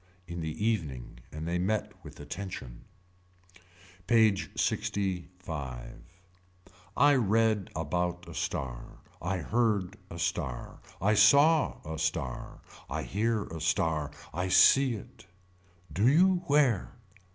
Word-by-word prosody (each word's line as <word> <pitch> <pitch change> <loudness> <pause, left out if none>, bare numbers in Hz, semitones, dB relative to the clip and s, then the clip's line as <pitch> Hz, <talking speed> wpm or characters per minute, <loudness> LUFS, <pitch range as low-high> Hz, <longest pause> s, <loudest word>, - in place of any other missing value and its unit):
In 85 -1 -6
the 80 +6 -3
evening 75 - -2
and 80 +2 -6
they 85 +1 -1
met 105 +4 -1
with - - -12
attention. 75 -11 -7 1.2
PAGE 110 -4 +3
LXV. 90 -11 -3 1.0
I 145 +1 +6
read 110 -4 +2
about 90 +2 -2
a 85 - -9
star. 65 -5 -4 0.2
I 95 +3 -1
heard 105 0 0
a 85 - -8
star. 65 -6 -3 0.2
I 105 +3 +2
saw 140 +9 +5
a 80 0 -5
star. 80 -6 -3 0.3
I - - -3
hear 110 +1 0
a 80 -3 -8
star. 80 -2 0 0.2
I 90 +3 -1
see 130 +7 +5
it. 95 -2 -12 0.7
Do 100 +9 +2
you 180 +7 +5
where. 140 -9 +2
90 Hz, 115 wpm, -29 LUFS, 80-110 Hz, 1.2 s, I